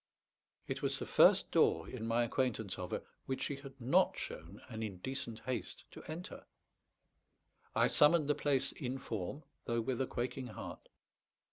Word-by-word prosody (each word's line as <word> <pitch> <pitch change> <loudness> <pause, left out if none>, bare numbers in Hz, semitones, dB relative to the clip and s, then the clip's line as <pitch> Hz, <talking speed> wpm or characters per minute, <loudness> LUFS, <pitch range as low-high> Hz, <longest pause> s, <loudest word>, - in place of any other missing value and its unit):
It - - -3
was - - +1
the - - -4
first - - +6
door, 80 0 +4
in 115 -3 -5
my 115 +1 +3
acquaintance 115 -5 0
of 90 -1 -4
her, - - -3 0.2
which 130 - -1
she 140 - -1
had 135 -1 -11
not 125 +2 +3
shown 85 +6 -6
an 110 -3 -6
indecent 110 +4 -4
haste 120 -6 -4
to - - -10
enter. 165 +4 -7 1.3
I - - +5
summoned 150 0 +5
the 150 - +4
place 140 -3 +1
in 130 -2 -4
form, 115 - -4 0.2
though 115 0 +1
with 125 +2 -1
a 130 - +1
quaking 125 +1 -3
heart. 110 - -8
125 Hz, 160 wpm, -35 LUFS, 110-135 Hz, 1.3 s, first